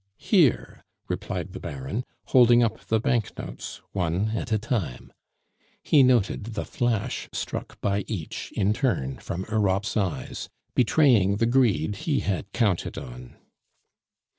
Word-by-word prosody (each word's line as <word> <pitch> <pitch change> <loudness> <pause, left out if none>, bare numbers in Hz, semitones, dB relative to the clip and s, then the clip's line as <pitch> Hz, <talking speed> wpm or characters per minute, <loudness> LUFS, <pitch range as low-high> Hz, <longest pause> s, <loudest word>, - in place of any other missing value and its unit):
"Here," - - +2 0.2
replied - - -4
the - - -6
Baron, 70 - -4 0.2
holding 120 -1 +6
up 115 - -1
the 110 - +2
banknotes, 115 -1 -3
one 90 +2 0
at 110 - -3
a 110 - +3
time. 105 - -3 0.7
He 145 - +5
noted 115 -3 +2
the - - -2
flash 120 -4 -1
struck - - -5
by 100 -1 0
each 90 -9 -5
in 100 +1 +2
turn 90 - -1
from 95 +2 -5
Europe's 100 -1 +1
eyes, 95 -6 -2 0.2
betraying 120 -6 +4
the 115 +3 +1
greed 110 - +2
he 155 -4 0
had 100 0 -2
counted 105 -7 0
on. - - -9
105 Hz, 130 wpm, -26 LUFS, 95-120 Hz, 0.7 s, holding